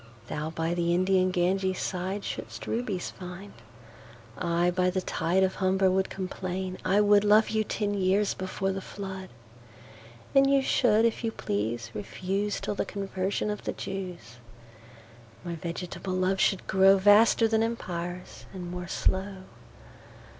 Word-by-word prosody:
Thou 150 0 -3
by 165 +1 -2
the 170 0 +1
Indian 185 0 +3
Ganges 185 +1 +1
sideShould'st 190 +2 -4
Rubies 220 -6 -2
find: 180 +2 -9 0.8
I 175 0 +1
by 180 0 +2
the 185 +1 -1
TideOf 185 +3 +1
Humber 190 0 +2
would 190 +1 +1
complain. 185 0 -4
I 195 +3 +3
wouldLove 210 +1 +5
you 220 0 +1
ten 205 -1 -2
years 195 +1 +2
before 190 +1 -2
the 195 0 -4
Flood:And 120 - -4
you 275 -1 +4
should 225 -4 +3
if 230 +1 0
you 225 - 0
please 115 - -3
refuseTill 195 - -3
the - - +1
Conversion 195 +1 -2
of 210 - -6
the - - -2
Jews.My 120 - -10
vegetable 175 +3 -5
Love 185 +1 +1
should 195 - +2
growVaster 200 +4 +5
then 220 0 +2
Empires, 180 -6 -4
and 175 -2 -6
more 180 0 -5
slow. 190 +1 -1
185 Hz, 125 wpm, -28 LUFS, 170-200 Hz, 0.8 s, wouldLove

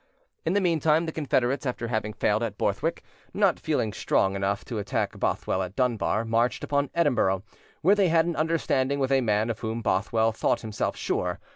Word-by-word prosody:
In 165 - +2
the 205 - +2
meantime 160 -2 +2
the 160 - -3
Confederates, 135 -4 0
after 120 -3 -3
having 110 -2 -2
failed 105 +2 +1
at 110 -3 -3
Borthwick, 150 +12 -1 0.3
not 200 -4 +3
feeling 130 -9 -1
strong 95 -1 +1
enough 100 +1 -1
to 115 -4 -4
attack 100 - -2
Bothwell 95 - 0
at 95 +1 -5
Dunbar, 115 -3 0
marched 115 +2 +1
upon 140 -1 0
Edinburgh, 120 - +2 0.4
where 190 +5 +6
they 200 -2 +3
had 165 -1 +3
an 170 -1 -2
understanding 140 -4 0
with 135 -1 0
a 135 -1 +4
man 110 0 +1
of 110 - -6
whom 110 +1 -4
Bothwell 110 +4 +1
thought 110 - 0
himself 110 -2 -3
sure. 90 +1 -2
120 Hz, 185 wpm, -26 LUFS, 105-155 Hz, 0.4 s, where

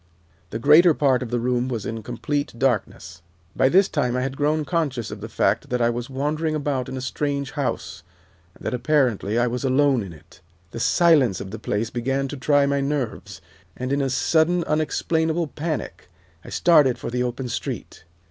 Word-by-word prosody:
The 110 - -4
greater 150 +7 +6
part 135 -3 +2
of 125 - -4
the 120 0 -1
room 125 +1 0
was 115 -5 -4
in 110 0 -4
complete 145 +5 -3
darkness. 95 -8 -2 0.3
"By 130 - +3
this 190 +5 +5
time 125 0 -1
I 125 - 0
had 135 0 -3
grown 150 +2 0
conscious 145 -9 -2
of - - -8
the - - -6
fact - - 0
that 125 - 0
I 120 0 +2
was 120 +1 -5
wandering 150 +4 -1
about 140 -4 -2
in 130 - -5
a - - -4
strange 140 +1 -2
house, 80 - -3 0.5
and - - -15
that, - - -1
apparently, 125 -6 +1
I 120 - +3
was 125 +2 -3
alone 135 -1 +3
in 95 -3 -7
it. 80 +1 -17 0.3
The - - -6
silence 145 - +3
of 95 - -7
the 110 - -6
place 110 +1 -2
began 135 +3 -1
to 145 - -5
try 145 +2 +3
my 140 0 0
nerves, 140 -4 -3 0.4
and 130 +2 -2
in 140 - +1
a 135 - 0
sudden, 165 +6 +2
unexplainable 160 +2 0
panic 155 -1 -5 0.3
I - - -11
started 150 -7 +4
for - - -6
the 125 +1 -1
open 125 +1 -3
street. 120 - -5
130 Hz, 195 wpm, -23 LUFS, 120-150 Hz, 0.5 s, greater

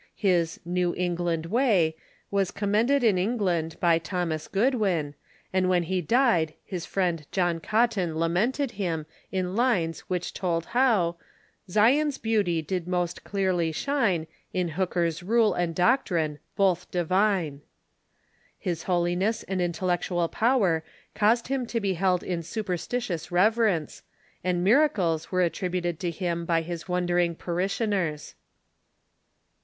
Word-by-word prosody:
His 175 -5 +1
" - - -39
New 175 -1 +1
England 175 -2 -1
Way 190 -6 +2 0.2
" - - -36
was 195 -2 +1
commended 225 +7 +1
in 205 -6 +4
England 180 -6 -1
by 170 -2 +3
Thomas 165 -2 -3
Goodwin, 195 - +1 0.4
and 185 -1 +2
when 180 -1 +3
he 185 +2 -1
died 175 - +2
his 180 -4 -5
friend 170 -6 -1
John 175 -3 +1
Cotton 210 -4 +1
lamented 220 - 0
him 170 -7 -3 0.3
in 185 -1 -2
lines 200 -9 +1
which 180 -1 -2
told 170 -3 -1
how 215 -10 +3 0.5
"Zion's 270 +9 +3
beauty 200 -8 0
did 175 +2 -3
most 180 -1 -2
clearly 185 -5 0
shine 200 - 0 0.3
In 180 -2 0
Hooker's 170 -1 -1
rule 220 +3 +3
and 170 -2 -1
doctrine, 175 - +1 0.2
both 180 -3 +1
divine." 180 -4 +1 1.0
His 170 -3 -3
holiness 180 +5 +1
and 190 -1 -2
intellectual 175 0 0
power 200 -8 +2 0.3
caused 225 +3 +2
him 260 -2 -1
to 230 - -1
be 200 -3 0
held 180 0 +1
in 175 -2 -2
superstitious 185 -1 -3
reverence, 195 -3 +2 0.4
and 180 -1 0
miracles 190 - +2
were 185 -1 +2
attributed 175 -1 -2
to 175 - -1
him 170 0 -2
by 165 -1 +1
his 170 +2 -6
wondering 175 -1 +1
parishioners. 180 -2 -2
180 Hz, 130 wpm, -26 LUFS, 170-210 Hz, 1.0 s, in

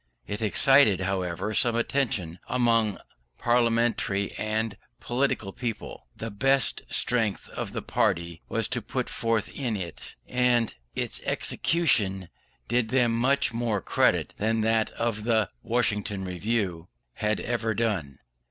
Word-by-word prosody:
It 105 +2 -4
excited, 110 -2 +5
however, 95 +1 -2
some 120 +1 +2
attention 115 -9 -1
among 115 -4 +2 0.4
parliamentary 115 -4 +1
and 110 0 -2 0.2
political 120 -6 -1
people. 120 -3 -5
The 115 0 -5
best 135 +6 +2
strength 110 -5 0
of - - -5
the - - -4
party 85 -1 0
was - - +1
put - - -2
forth 115 -2 0
in 120 -6 -2
it; 85 -4 -7
and 125 -2 +2 0.2
its - - -2
execution 105 - 0 0.4
did 120 -1 +1
them 125 -2 +3
much 135 +2 +2
more 115 -3 0
credit - - +1
than 110 +1 +1
that 110 0 +2
of 115 -2 -2
the 110 -4 +2
Westminster 110 -3 0
Review 95 -1 -2 0.3
had 105 0 -1
ever 115 -2 -1
done. 95 - -1
110 Hz, 125 wpm, -27 LUFS, 100-120 Hz, 0.4 s, excited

